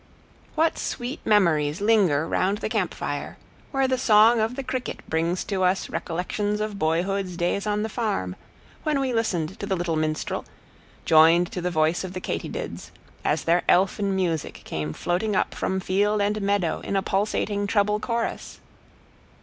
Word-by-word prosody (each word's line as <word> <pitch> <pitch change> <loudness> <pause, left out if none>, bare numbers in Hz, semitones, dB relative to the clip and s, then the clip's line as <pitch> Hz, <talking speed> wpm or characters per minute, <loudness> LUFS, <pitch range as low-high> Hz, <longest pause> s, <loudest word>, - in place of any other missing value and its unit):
What 325 +1 +2
sweet 245 +5 -4
memories 165 -6 +3
linger 195 -8 +3
round 195 +4 +1
the - - -3
camp - - 0
fire, - - -5 0.3
where 270 -1 +1
the 260 -1 0
song 225 0 +6
of 225 +3 0
the 275 - -4
cricket 255 0 -4
brings 165 +3 0
to 195 -2 -2
us 185 +1 +1
recollections 205 +5 -2
of 210 -1 -3
boyhood's 180 +3 0
days 185 +4 -1
on 210 0 0
the - - -1
farm, 210 - -2 0.5
when 305 -3 0
we 265 -2 0
listened 190 -7 -1
to 200 - -4
the 195 - +1
little 175 -2 -1
minstrel, 155 -1 -2 0.6
joined 165 +2 +5
to 180 - -4
the 180 - -1
voice 160 +1 +1
of 185 -1 -6
the 185 - -4
katydids, - - -5 0.3
as - - 0
their 170 +1 +3
elfin 195 +2 +3
music 170 -5 -2
came 75 0 -4
floating 185 - -1
up - - +1
from 190 - -1
field 205 +3 +1
and 210 +1 0
meadow 200 -4 0
in - - -4
a 195 - +1
pulsating 205 +1 0
treble 210 0 +2
chorus. 230 +1 -3
195 Hz, 165 wpm, -25 LUFS, 175-215 Hz, 0.6 s, song